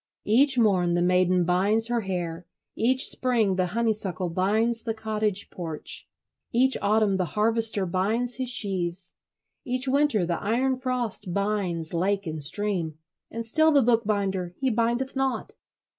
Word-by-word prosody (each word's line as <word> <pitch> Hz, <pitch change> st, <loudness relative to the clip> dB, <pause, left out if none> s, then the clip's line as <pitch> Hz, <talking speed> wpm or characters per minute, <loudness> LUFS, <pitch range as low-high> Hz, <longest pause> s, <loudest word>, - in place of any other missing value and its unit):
Each 260 Hz, +5 st, +3 dB
morn 185 Hz, -7 st, +2 dB
the 175 Hz, -, +1 dB
maiden 180 Hz, 0 st, +2 dB
binds 200 Hz, +6 st, +2 dB
her 240 Hz, 0 st, -1 dB
hair, 175 Hz, -3 st, -5 dB, 0.3 s
each 255 Hz, +3 st, +4 dB
spring 230 Hz, -7 st, 0 dB
the 185 Hz, -1 st, 0 dB
honeysuckle 205 Hz, -4 st, -2 dB
binds 220 Hz, +6 st, 0 dB
the 225 Hz, -2 st, -4 dB
cottage 215 Hz, -2 st, -2 dB
porch, 165 Hz, -4 st, -3 dB, 0.4 s
each 260 Hz, +3 st, +4 dB
autumn 205 Hz, -1 st, +2 dB
the 185 Hz, -, 0 dB
harvester 220 Hz, -2 st, +3 dB
binds 215 Hz, +7 st, -1 dB
his 260 Hz, -2 st, -2 dB
sheaves, 180 Hz, -5 st, +1 dB, 0.5 s
each 255 Hz, +2 st, -1 dB
winter 270 Hz, -8 st, +2 dB
the 170 Hz, 0 st, -3 dB
iron 250 Hz, +5 st, 0 dB
frost 250 Hz, -8 st, -1 dB
binds 195 Hz, -6 st, -2 dB
lake 195 Hz, +3 st, -1 dB
and 160 Hz, -2 st, -5 dB
stream, 170 Hz, -1 st, -1 dB, 0.3 s
and 230 Hz, 0 st, -6 dB
still 315 Hz, +7 st, +3 dB
the 280 Hz, -3 st, +4 dB
bookbinder 200 Hz, -6 st, 0 dB
he 265 Hz, -1 st, -1 dB
bindeth 235 Hz, +4 st, -1 dB
not. 270 Hz, 0 st, -2 dB
210 Hz, 145 wpm, -25 LUFS, 185-235 Hz, 0.5 s, each